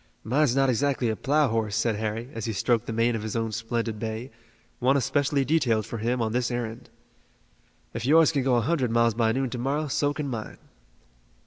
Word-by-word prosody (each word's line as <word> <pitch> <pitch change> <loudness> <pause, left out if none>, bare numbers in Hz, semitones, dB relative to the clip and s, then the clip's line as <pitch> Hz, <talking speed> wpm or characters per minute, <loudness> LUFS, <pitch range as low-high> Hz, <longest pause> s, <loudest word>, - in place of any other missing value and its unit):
"Mine's 130 +2 +2
not 135 0 +3
exactly 130 -1 +1
a 110 - -1
plough 145 +5 +2
horse," 110 -2 -1
said 115 0 +1
Harry, 110 +3 -3
as 115 -2 -5
he 115 - -2
stroked 115 +2 0
the - - -3
mane 115 +1 +1
of 110 - -3
his 110 +1 -5
own 115 -1 -1
splendid 115 0 -3
bay, 110 +3 -5 0.5
one 130 +3 +3
especially 140 +1 +1
detailed 120 -8 +1
for 115 0 -6
him 120 +2 0
on 110 - -1
this 120 +1 0
errand. 120 -2 -5 1.0
"If 115 - -4
yours 160 +2 +6
can 145 -4 0
go 130 -1 +2
a 120 - +3
hundred 135 -1 0
miles 115 0 +3
by 110 0 +2
noon 130 +1 -1
to 125 - -4
morrow 145 +5 -1
so 145 +2 +1
can 145 0 -4
mine." 115 -5 -5
120 Hz, 210 wpm, -26 LUFS, 115-135 Hz, 1.0 s, yours